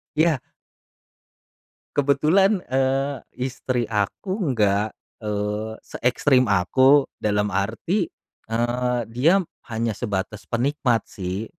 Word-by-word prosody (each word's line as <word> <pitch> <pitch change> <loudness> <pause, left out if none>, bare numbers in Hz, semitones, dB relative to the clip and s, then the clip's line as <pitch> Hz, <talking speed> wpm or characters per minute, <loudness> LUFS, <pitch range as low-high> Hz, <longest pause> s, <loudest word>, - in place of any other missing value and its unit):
Iya. 155 -3 +3 1.6
Kebetulan, 155 +9 +3
eee, 135 0 0 0.2
istri 125 -1 -2
aku 105 - -2 0.2
nggak, 105 -2 +2 0.3
eee, 105 +1 -2
seekstrem 125 -1 +2
aku, 130 +9 +5 0.2
dalam 105 -2 0
arti, 115 - 0 0.4
eee, 120 +2 0
dia 135 +12 +3 0.3
hanya 115 -1 -1
sebatas 105 -1 -4
penikmat, 125 -2 +1
sih. 95 +3 -4
120 Hz, 90 wpm, -23 LUFS, 105-135 Hz, 1.6 s, aku